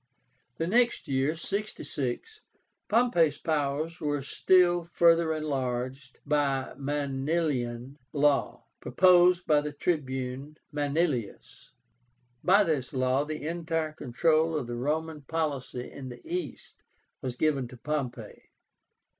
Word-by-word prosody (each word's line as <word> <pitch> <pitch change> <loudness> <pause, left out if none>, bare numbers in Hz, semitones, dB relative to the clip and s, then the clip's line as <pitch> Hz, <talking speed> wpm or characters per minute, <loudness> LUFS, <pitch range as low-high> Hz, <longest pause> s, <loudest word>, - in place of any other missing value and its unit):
The 165 - -1
next 235 +6 +2
year 135 +3 +1
(66) 200 - -4 0.5
Pompey's 190 -10 +3
powers 155 +2 -2
were 145 -2 -1
still 175 +4 +3
further 170 -1 +3
enlarged 135 -3 -3
by 140 -3 0
the 140 - -15
MANILIAN 140 -2 -2
LAW, 145 -1 +1 0.2
proposed 180 +6 +4
by 150 -1 +4
the 150 0 -4
Tribune 140 -2 -3
Manilius. 145 - -2 0.7
By 200 +3 +5
this 150 -8 -1
law 130 +2 +1
the 155 0 -5
entire 165 -2 -2
control 155 +4 +1
of 140 - -3
the 120 0 -5
Roman 155 +4 -2
policy 140 -4 -3
in 135 -2 -8
the 120 - -10
East 355 +1 -6 0.4
was 130 -3 -4
given 140 -2 +1
to 125 - -12
Pompey. 140 -1 -5
150 Hz, 115 wpm, -28 LUFS, 135-165 Hz, 0.7 s, By